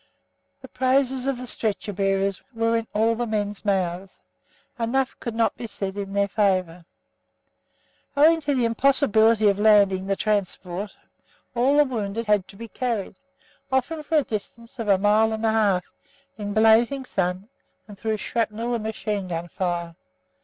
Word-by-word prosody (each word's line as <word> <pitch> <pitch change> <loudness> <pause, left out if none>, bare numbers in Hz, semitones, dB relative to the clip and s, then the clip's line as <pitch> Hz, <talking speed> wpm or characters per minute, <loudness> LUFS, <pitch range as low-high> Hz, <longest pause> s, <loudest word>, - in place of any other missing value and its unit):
The - - -9
praises 260 0 +1
of 275 -2 0
the 250 - -7
stretcher 215 -3 -2
bearers 195 0 0
were 230 0 +1
in 230 -1 -1
all 225 +2 +2
the 240 +1 -3
men's 210 -2 -3
mouths; 190 -2 -2 0.6
enough 255 +3 0
could 235 -3 -5
not 230 0 +1
be 235 - -6
said 195 -2 -4
in 200 -1 -5
their 200 0 +2
favour. 185 -5 0 1.3
Owing 320 +3 +5
to 290 -2 0
the 250 -2 +1
impossibility 230 -3 +4
of 200 0 +2
landing 200 -3 +4
the 195 - +1
transport, 200 -2 -2 0.6
all 260 +4 +2
the 295 - +6
wounded 230 -3 -3
had 210 -3 +2
to - - -14
be 230 +3 -8
carried; 225 -5 -3 0.5
often 265 +5 0
for 310 +1 0
a 295 - +3
distance 230 +2 -7
of 225 - -3
a 200 -2 +5
mile 210 +3 +3
and 220 +1 -3
a 220 - +3
half, 205 -5 +1 0.4
in 205 -2 -5
a - - -3
blazing 225 +5 +4
sun, 185 -2 -2 0.4
and 205 -2 -12
through 220 0 -1
shrapnel 230 +2 -2
and 235 - -1
machine 215 -2 -3
gun 170 0 -4
fire. 170 -2 -3
215 Hz, 165 wpm, -24 LUFS, 195-235 Hz, 1.3 s, the